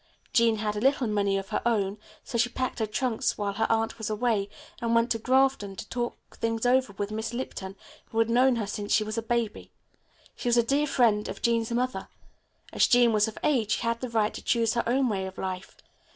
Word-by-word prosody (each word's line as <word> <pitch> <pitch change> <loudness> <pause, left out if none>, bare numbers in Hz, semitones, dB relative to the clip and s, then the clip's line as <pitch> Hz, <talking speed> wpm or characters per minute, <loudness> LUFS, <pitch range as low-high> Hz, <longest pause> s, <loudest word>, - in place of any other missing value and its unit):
"Jean 230 -2 +4
had 210 -1 -2
a - - -2
little 270 0 +3
money 200 -2 +1
of 195 0 -5
her - - -1
own, 205 -3 0 0.2
so - - -8
she 240 +1 +2
packed 255 +1 -3
her 220 - 0
trunks 230 +1 -1
while 205 -1 -2
her 225 +3 0
aunt 225 +1 0
was 220 - -3
away 215 -2 0 0.3
and 230 0 +1
went 230 +1 +2
to 225 - +1
Grafton 260 -4 +2
to 210 - -8
talk 240 -1 -2 0.2
things 225 0 -1
over 255 -2 +3
with 200 +1 -4
Miss 220 +2 -3
Lipton, 195 -6 -5 0.3
who 225 - -8
has 225 0 +4
known 250 +2 +4
her 225 -3 -2
since 205 +1 -5
she 215 - +4
was 215 +1 -3
a - - -3
baby. 230 -1 -2 0.6
She 245 - -2
was 240 - +3
a 235 - +5
dear 280 +5 +1
friend 230 -6 +2
of - - -7
Jean's 230 -1 +1
mother. 250 +2 -1 0.7
As - - +4
Jean 240 -2 +5
was 210 0 +3
of 220 - -7
age 235 -8 +2
she - - -1
had 230 0 -1
the 255 - -3
right 220 -2 +1
to - - -7
choose 230 -2 +1
her 235 - 0
own 260 +2 +2
way 195 -4 -1
of 190 - -10
life. 185 0 -5
230 Hz, 230 wpm, -27 LUFS, 210-240 Hz, 0.7 s, a